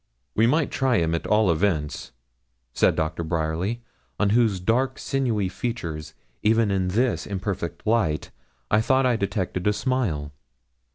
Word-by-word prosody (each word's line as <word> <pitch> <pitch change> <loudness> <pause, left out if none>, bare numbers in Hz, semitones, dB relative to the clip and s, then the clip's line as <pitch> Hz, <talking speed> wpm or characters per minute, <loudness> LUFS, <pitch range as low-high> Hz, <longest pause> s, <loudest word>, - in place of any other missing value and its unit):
'We 110 +2 +4
might 150 +4 +2
try 130 -3 +2
him 80 -1 +1
at 85 - -2
all 105 -3 +4
events,' 80 -7 -1 0.6
said - - +3
Doctor 80 +1 -1
Bryerly, 85 +8 -2 0.4
on 105 -1 +2
whose 110 -4 +3
dark 125 +8 +1
sinewy 120 -8 0
features, 85 -8 -5 0.3
even 110 -1 +3
in 95 -2 +1
this 115 +6 0
imperfect 95 -4 -4
light, 105 -9 +1 0.4
I 110 - +4
thought 130 +3 +3
I 125 -2 +3
detected 95 -3 -2
a 105 - +4
smile. 105 - -1
100 Hz, 140 wpm, -24 LUFS, 85-115 Hz, 0.6 s, We